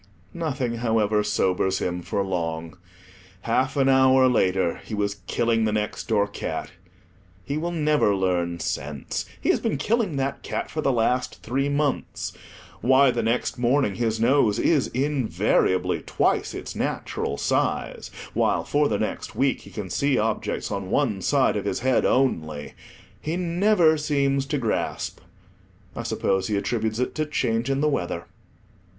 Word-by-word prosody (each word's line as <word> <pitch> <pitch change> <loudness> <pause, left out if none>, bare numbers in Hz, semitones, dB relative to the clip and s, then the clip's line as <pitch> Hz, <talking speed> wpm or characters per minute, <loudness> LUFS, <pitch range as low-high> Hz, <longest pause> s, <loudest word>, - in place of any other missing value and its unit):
Nothing, 135 -8 -2
however, 110 -2 +1
sobers 95 -1 +1
him 90 0 -2
for 100 +3 -1
long. 85 -2 -3 0.7
Half 130 +5 0
an 135 -1 +3
hour 130 -1 +5
later, 95 -7 +2
he 110 - -5
was 100 -1 -2
killing 115 -1 +1
the 110 - +1
next 105 0 -2
door 105 -2 +2
cat. 100 - -5 0.7
He 140 - -3
will 165 +3 -1
never 150 -10 +2
learn 90 -2 0
sense; 80 -5 -3
he - - -2
has - - +4
been - - -1
killing 210 - 0
that 135 0 -2
cat - - -4
for 155 - -2
the 140 - +2
last 125 +1 0
three 135 +4 0
months. 145 0 -1 0.5
Why 130 +3 +5
the 120 - -1
next 115 +2 -1
morning 125 -3 +2
his 110 0 -1
nose 115 -3 +3
is 150 -5 +2
invariably 130 -8 +1
twice - - 0
its - - -6
natural 70 - -2
size, - - -1 0.2
while - - +1
for 145 0 +2
the 105 - 0
next 105 - -4
week 135 0 +1
he - - -13
can 100 -5 -6
see 140 -1 +1
objects 110 0 -1
on 100 -2 -3
one 110 -8 +1
side - - +2
of - - -2
his - - -1
head 130 0 +2
only, 80 - 0 0.5
he 160 +3 -2
never 175 -2 +3
seems 140 -2 +1
to 145 - -1
grasp; 115 -5 -2 0.8
I - - -3
suppose 95 -1 0
he 105 - 0
attributes 110 +1 -1
it 125 - -1
to 155 -1 -2
change 120 -4 0
in 135 0 +1
the 150 - +3
weather. 85 - -2
120 Hz, 155 wpm, -24 LUFS, 100-140 Hz, 0.8 s, hour